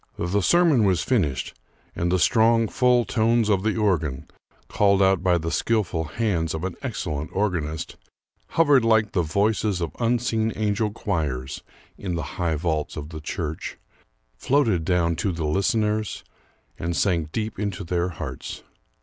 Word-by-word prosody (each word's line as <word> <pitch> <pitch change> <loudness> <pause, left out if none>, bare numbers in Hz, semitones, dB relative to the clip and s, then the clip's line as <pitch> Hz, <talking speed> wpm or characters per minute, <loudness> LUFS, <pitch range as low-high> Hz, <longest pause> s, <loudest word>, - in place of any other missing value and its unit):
The 95 +4 0
sermon 165 - +4
was 95 -4 +2
finished, 75 - 0 0.4
and 85 +1 -1
the 90 - +3
strong 115 +4 +4
full 125 +1 +3
tones 115 -1 +2
of 100 -3 +3
the 110 +2 0
organ, 80 -11 0 0.4
called 100 -1 +3
out 95 -2 +3
by 90 -1 +3
the 80 0 -3
skillful 90 -6 0
hands 85 -3 -1
of 80 - -5
an 95 -2 -3
excellent 80 - -3
organist, 85 -6 -2 0.6
hovered 145 -6 +5
like 110 -2 +3
the 90 - +1
voices 100 +3 0
of 85 -3 -2
unseen 115 -2 +1
angel 105 0 0
choirs 70 -10 -3 0.4
in 90 -3 -3
the 85 - -2 0.2
high 80 -2 +1
vaults 80 -1 -2
of 75 0 -6
the 80 -1 -8
church, 80 0 -4 0.6
floated 110 - +1
down 85 -2 +1
to 100 - 0
the 85 -2 -3
listeners, 105 +5 0 0.6
and 85 0 -2
sank 85 -6 +1
deep 110 0 -3
into 100 -3 -3
their 85 +1 -1
hearts. 85 - -7
95 Hz, 150 wpm, -24 LUFS, 80-110 Hz, 0.6 s, hovered